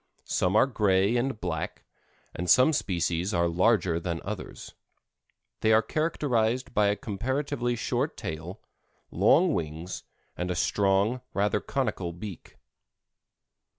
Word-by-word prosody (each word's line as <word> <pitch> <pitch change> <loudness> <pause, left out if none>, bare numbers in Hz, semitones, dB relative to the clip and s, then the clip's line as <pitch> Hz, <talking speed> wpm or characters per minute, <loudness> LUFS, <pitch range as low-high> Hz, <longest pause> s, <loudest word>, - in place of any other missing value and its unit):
Some 90 +2 0
are 110 - +6
gray 105 -4 +2
and 120 -1 -1
black, 85 -5 -4 0.5
and 90 +1 -4
some 130 +5 +6
species 90 - -1
are 85 0 +2
larger 90 -1 +2
than 85 -1 -3
others. 105 0 -7 0.9
They 110 - +2
are 110 +1 +5
characterized 130 -5 0
by 105 -1 +3
a 100 - +2
comparatively 120 +4 -2
short - - -2
tail, 80 +6 -6 0.5
long 175 0 +4
wings, 80 - -4 0.3
and 90 +1 -3
a 90 - -1
strong, 100 +6 +1
rather 105 +1 +1
conical 110 -10 -2
beak. 95 +1 -9
100 Hz, 120 wpm, -27 LUFS, 90-120 Hz, 0.9 s, are